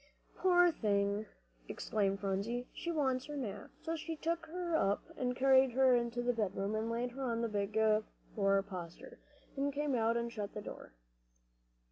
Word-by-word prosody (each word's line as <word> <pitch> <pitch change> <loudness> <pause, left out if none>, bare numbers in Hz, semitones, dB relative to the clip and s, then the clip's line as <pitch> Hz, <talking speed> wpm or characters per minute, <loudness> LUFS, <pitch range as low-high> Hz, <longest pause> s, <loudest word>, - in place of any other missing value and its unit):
"Poor 355 -1 +5
thing!" 205 -4 0 0.4
exclaimed 195 -2 -1
Polly, 205 +6 -2
"she 340 - -3
wants 265 -5 0
her 295 -1 -6
nap." 230 -8 -5
So 330 0 -1
she 325 +1 -4
took 330 +1 -2
her 345 0 -2
up, 200 -9 +2
and 250 -1 -1
carried 265 -1 +5
her 260 0 +5
into 240 0 0
the 245 0 +2
bedroom, 205 -2 -1
and 220 +1 -1
laid 240 +2 -1
her 270 +3 -7
on 235 -2 -1
the 230 - +1
big 205 0 -2 0.6
four 195 -1 +3
poster, 180 -4 -8 0.4
and 280 +1 0
came 290 0 -1
out 230 -1 +2
and 235 0 -2
shut 205 -2 -5
the 210 - -4
door. - - -9
235 Hz, 170 wpm, -34 LUFS, 205-275 Hz, 0.6 s, Poor